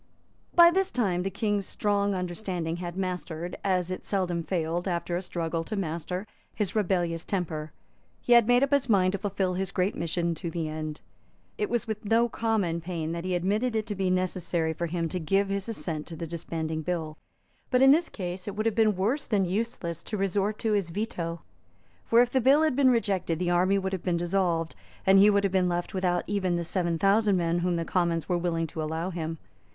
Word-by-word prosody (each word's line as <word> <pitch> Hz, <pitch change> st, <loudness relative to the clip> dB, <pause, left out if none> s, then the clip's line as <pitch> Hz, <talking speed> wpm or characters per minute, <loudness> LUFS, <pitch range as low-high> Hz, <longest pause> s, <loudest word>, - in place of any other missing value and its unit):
By 340 Hz, 0 st, +9 dB
this 385 Hz, +1 st, +1 dB
time 195 Hz, -, 0 dB
the 190 Hz, -, -1 dB
King's 205 Hz, 0 st, -1 dB
strong 200 Hz, -1 st, 0 dB
understanding 180 Hz, -2 st, -3 dB
had 175 Hz, 0 st, -6 dB
mastered, 180 Hz, -2 st, -3 dB
as 185 Hz, -2 st, 0 dB
it 185 Hz, -, -5 dB
seldom 180 Hz, -4 st, -1 dB
failed, 170 Hz, +1 st, -2 dB
after 175 Hz, -1 st, -1 dB
a 175 Hz, -, -1 dB
struggle, 165 Hz, -2 st, -3 dB
to 215 Hz, -, -4 dB
master, 180 Hz, +1 st, -3 dB, 0.3 s
his 210 Hz, -3 st, -2 dB
rebellious 175 Hz, -5 st, 0 dB
temper. 160 Hz, -5 st, -3 dB, 0.5 s
He 245 Hz, -, +2 dB
had 235 Hz, -2 st, +6 dB
made 245 Hz, +2 st, +5 dB
up 275 Hz, -, +1 dB
his 275 Hz, -2 st, +2 dB
mind 185 Hz, -3 st, +4 dB
to 200 Hz, -, -3 dB
fulfil 195 Hz, -2 st, -1 dB
his 190 Hz, +1 st, -2 dB
great 190 Hz, +1 st, 0 dB
mission 170 Hz, +1 st, -1 dB
to 170 Hz, +1 st, -5 dB
the 165 Hz, -1 st, -3 dB
end. 155 Hz, 0 st, -5 dB, 0.6 s
It 420 Hz, -2 st, 0 dB
was 240 Hz, -1 st, 0 dB
with 220 Hz, -2 st, -4 dB
no 225 Hz, +3 st, +3 dB
common 215 Hz, -8 st, -1 dB
pain 165 Hz, -2 st, -3 dB
that 170 Hz, +1 st, -4 dB
he 185 Hz, -1 st, 0 dB
admitted 210 Hz, +7 st, 0 dB
it 215 Hz, -1 st, 0 dB
to 215 Hz, -, -3 dB
be 190 Hz, -1 st, 0 dB
necessary 180 Hz, -3 st, 0 dB
for 170 Hz, +2 st, -3 dB
him 165 Hz, 0 st, -1 dB
to 180 Hz, -, -3 dB
give 195 Hz, +5 st, +1 dB
his 200 Hz, +2 st, -2 dB
assent 160 Hz, -8 st, -4 dB
to 170 Hz, -, -7 dB
the 165 Hz, -, -5 dB
disbanding 160 Hz, -1 st, -4 dB
bill. 160 Hz, -2 st, -3 dB, 0.5 s
But 255 Hz, 0 st, +4 dB
in 270 Hz, -, +8 dB
this 320 Hz, +3 st, +3 dB
case 180 Hz, -1 st, -5 dB
it 200 Hz, -, -4 dB
would 215 Hz, +1 st, -2 dB
have 225 Hz, -, +2 dB
been 215 Hz, -1 st, +3 dB
worse 225 Hz, +11 st, 0 dB
than 200 Hz, -4 st, +2 dB
useless 180 Hz, -4 st, -2 dB
to 215 Hz, -, -4 dB
resort 195 Hz, +2 st, 0 dB
to 220 Hz, -, +3 dB
his 200 Hz, -4 st, +1 dB
veto. 170 Hz, -4 st, -4 dB, 0.6 s
For, 235 Hz, +1 st, +6 dB
if 245 Hz, -, -4 dB
the 260 Hz, -, +2 dB
bill 275 Hz, +5 st, +5 dB
had 310 Hz, -5 st, +2 dB
been 275 Hz, -1 st, +5 dB
rejected, 195 Hz, -8 st, +1 dB
the 175 Hz, +1 st, 0 dB
army 185 Hz, +3 st, +3 dB
would 190 Hz, 0 st, -2 dB
have 185 Hz, -, -2 dB
been 175 Hz, -2 st, +1 dB
dissolved, 170 Hz, -2 st, 0 dB, 0.3 s
and 195 Hz, 0 st, +6 dB
he 205 Hz, +2 st, +7 dB
would 200 Hz, -1 st, +3 dB
have 195 Hz, -1 st, 0 dB
been 185 Hz, -1 st, +3 dB
left 175 Hz, +3 st, -2 dB
without 180 Hz, -2 st, 0 dB
even 190 Hz, -3 st, 0 dB
the 170 Hz, -, -1 dB
seven 170 Hz, -1 st, -1 dB
thousand 200 Hz, +2 st, +3 dB
men 170 Hz, 0 st, +1 dB
whom 175 Hz, 0 st, 0 dB
the 165 Hz, 0 st, -2 dB
Commons 170 Hz, -3 st, 0 dB
were 175 Hz, -1 st, +1 dB
willing 165 Hz, -1 st, 0 dB
to 160 Hz, 0 st, -5 dB
allow 160 Hz, +4 st, -2 dB
him. 165 Hz, -2 st, -4 dB
185 Hz, 215 wpm, -27 LUFS, 170-205 Hz, 0.6 s, By